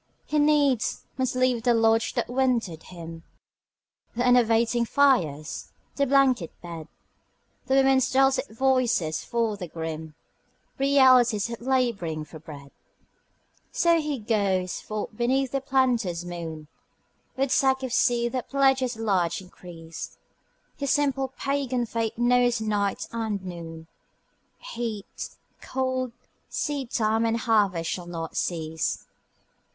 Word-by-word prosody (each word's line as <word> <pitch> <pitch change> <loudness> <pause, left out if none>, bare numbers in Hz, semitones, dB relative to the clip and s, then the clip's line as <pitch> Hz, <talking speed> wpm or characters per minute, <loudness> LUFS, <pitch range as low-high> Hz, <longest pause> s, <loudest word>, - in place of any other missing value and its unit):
He 300 - 0
needs 290 -5 +2
must 260 -1 -1
leave 255 -2 +2
the 240 0 +3
lodge 225 0 +2
that - - 0
wintered 245 -10 0
him, 165 -2 -9 0.9
The 245 +1 0
enervating 235 -1 +3
fires, 200 - +1 0.2
the 280 0 +1
blanket 260 - +3
bed 165 -3 -8 0.8
The 265 - +2
women's 270 -1 +4
dulcet 270 +1 +3
voices, 240 -9 +1
for 230 -3 -1
the 180 -3 -6
grim 160 -1 -6 0.6
Realities 255 -5 +5
of 235 - -6
labouring 235 -12 0
for 155 +1 -11
bread. 145 -3 -11 1.0
So 335 -1 +3 0.2
goes 195 -5 0
he - - -16
forth 215 0 -4
beneath 255 +3 +1
the 275 - -1
planter's 245 -10 +1
moon 165 -3 -6 0.7
With 270 0 0
sack 265 -1 +3
of 255 -2 -3
seed 240 -2 +2
that 255 -2 -4
pledges 265 -3 +2
large 185 -6 0
increase, 170 -3 -10 0.6
His 280 -1 -2
simple 275 -2 +1
pagan 265 -2 -2
faith 225 -1 -2
knows 245 0 +3
night 205 -2 -1
and 220 -3 -2
noon, 165 -2 -8 0.9
Heat, 220 -4 -5 0.3
cold, 260 -1 -2 0.4
seedtime 235 -6 0
and 230 0 +1
harvest 205 -8 +1
shall 175 -2 -4
not 165 -2 -6
cease. 160 -2 -2
230 Hz, 120 wpm, -26 LUFS, 180-260 Hz, 1.0 s, Realities